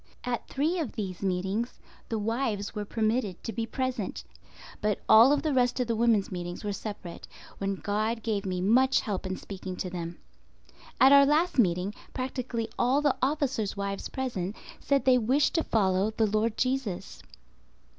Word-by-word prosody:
At 245 -1 -3
three 315 +6 0
of 295 -9 -3
these 190 -5 -5
meetings 195 +5 -2 0.3
the 225 - -1
wives 220 -1 -2
were 210 -1 -4
permitted 215 -3 -1
to 225 - -4
be 225 +2 -2
present; 260 +2 -3 0.6
but 210 -1 0
all 245 +7 +7
the 300 0 -1
rest 250 -1 +2
of 250 - +2
the 230 -1 -1
women's 225 -3 +2
meetings 175 0 -5
were 205 -1 -2
separate, 200 -4 -7 0.3
when 195 0 -1
God 215 +3 -2
gave 210 -3 -1
me 185 -2 -2
much 255 +7 +4
help 200 -4 -3
in 185 - -3
speaking 190 -2 -7
to 180 0 -4
them. 170 -1 -5 0.8
At 265 - +7
our 280 0 +8
last 310 +1 +2
meeting, 180 -1 +2 0.2
practically 255 -3 -3
all 265 +4 +3
the 290 -3 +3
officers' 265 -7 0
wives 200 0 -3
present 220 -8 -3 0.2
said 280 -1 +1
they 255 -1 +5
wished 260 +6 +2
to 325 - +1
follow 195 -2 +2
the 220 0 +1
Lord 215 +1 0
Jesus. 255 -8 -2
220 Hz, 165 wpm, -28 LUFS, 195-255 Hz, 0.8 s, our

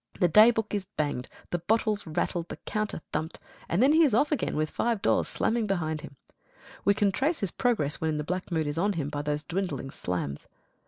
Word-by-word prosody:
The 180 - +5
daybook 220 +2 +5
is 200 -2 -1
banged, 145 -7 -3 0.2
the 175 - 0
bottles 210 +2 0
rattled, 170 +2 -2
the - - -6
counter 215 -5 -2
thumped, 155 +1 -2 0.3
and 175 +8 +3
then 280 +3 +5
he 325 +1 +6
is 275 -8 +3
off 285 +6 +3
again 300 - 0
with 155 0 0
five 235 -2 0
doors - - +2
slamming 225 -1 0
behind 160 -5 -1
him. 140 - -10 0.7
We 200 - +4
can 205 -1 +2
trace 290 - 0
his 195 -4 0
progress 215 - 0
when 160 -1 0
the 150 - -2
black 180 +4 -3
mood 160 -2 +1
is 145 +2 -2
on 205 +3 +2
him 150 -5 -2
by 145 0 -3
those 150 0 -2
dwindling 160 -6 -3
slams. 90 - -4
175 Hz, 210 wpm, -28 LUFS, 150-215 Hz, 0.7 s, he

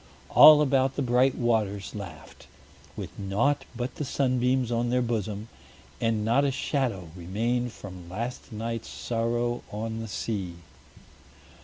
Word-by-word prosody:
All 150 -1 +9
about 135 -1 +2
the 140 - -1
bright 125 +1 +3
waters 105 -5 0
laughed, 85 -7 -9 0.5
with - - -6
naught 120 +9 +1
but 125 +1 -3
the - - -2
sunbeams 130 -2 +1
on 120 0 0
their 125 +1 +2
bosom, 110 -2 -2 0.5
and 110 -2 +1
not 120 +5 +3
a 140 - +3
shadow 125 - -1
remained 115 +8 -1
from 90 -5 -10
last 115 +7 -5
night's 115 +1 -4
sorrow 120 +1 -1
on 110 +2 -4
the 115 - -5
sea. 95 -3 -3
115 Hz, 135 wpm, -27 LUFS, 105-125 Hz, 0.5 s, All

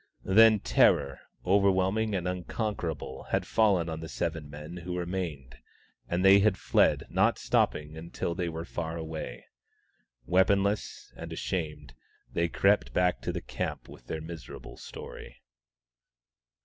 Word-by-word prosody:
Then 110 +2 +6
terror, 70 +2 +3 0.3
overwhelming 100 +2 +2
and 90 -1 -2
unconquerable, 90 - -4
had - - -1
fallen 100 -6 +3
on 80 -1 -4
the 80 0 -7
seven 75 -1 -3
men 75 +4 -8
who 90 0 -5
remained, 85 -8 -4 0.5
and 90 +2 0
they 95 +1 +8
had 100 -1 +3
fled, - - +3
never - - +2
stopping 75 +1 0
until 85 +1 -4
they 90 -1 -2
were 80 0 -5
far 85 -1 -4
away. 80 -1 -6 0.8
Weaponless 100 +3 +1
and - - -8
ashamed, 75 -7 -4 0.4
they 85 - +1
crept 100 +4 +2
back 90 0 +2
to - - -2
the - - -4
camp - - -4
with - - -14
their 80 - -4
miserable 80 0 -9
story. - - -10
85 Hz, 135 wpm, -29 LUFS, 80-95 Hz, 0.8 s, they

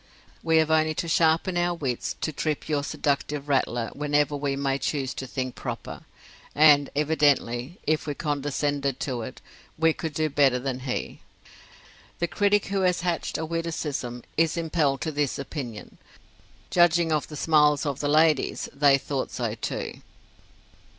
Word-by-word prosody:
We 160 0 +3
have 160 0 +3
only 155 0 +3
to 170 - -2
sharpen 165 +2 +2
our 175 0 +1
wits 130 -7 -3
to 155 - -2
trip 150 +1 -2
your 145 -2 0
seductive 145 0 -2
rattler 120 -4 0
whenever 145 0 +1
we 140 -1 -1
may 135 0 -1
choose 135 -4 -2
to 130 - -6
think 130 -1 -3
proper; - - -7 0.5
and 145 -2 +6
evidently, 145 -2 +1
if 155 0 0
we 145 - -2
condescended 145 -2 -1
to 125 -4 -2
it, 110 - -8 0.4
we 160 0 +3
could 160 -2 -5
do 155 0 +1
better 140 -3 +3
than 130 0 -3
he. 130 -1 -4 1.0
The 175 - 0
critic 205 +2 +2
who 195 - +1
has 180 -2 +2
hatched 175 -1 -1
a 160 - -3
witticism 155 -7 -3
is 165 +1 +2
impelled 155 -5 0
to 160 - -2
this 145 -2 -1
opinion. 130 -6 -7 0.7
Judging 175 -1 +4
by 155 -1 +3
the 150 - -10
smiles 150 -1 +3
of 140 -2 -2
the 145 - -1
ladies, 155 -1 +2
they 140 -1 +5
thought 135 -1 -3
so, 115 -4 -3
too. 115 - -5
145 Hz, 155 wpm, -26 LUFS, 135-160 Hz, 1.0 s, and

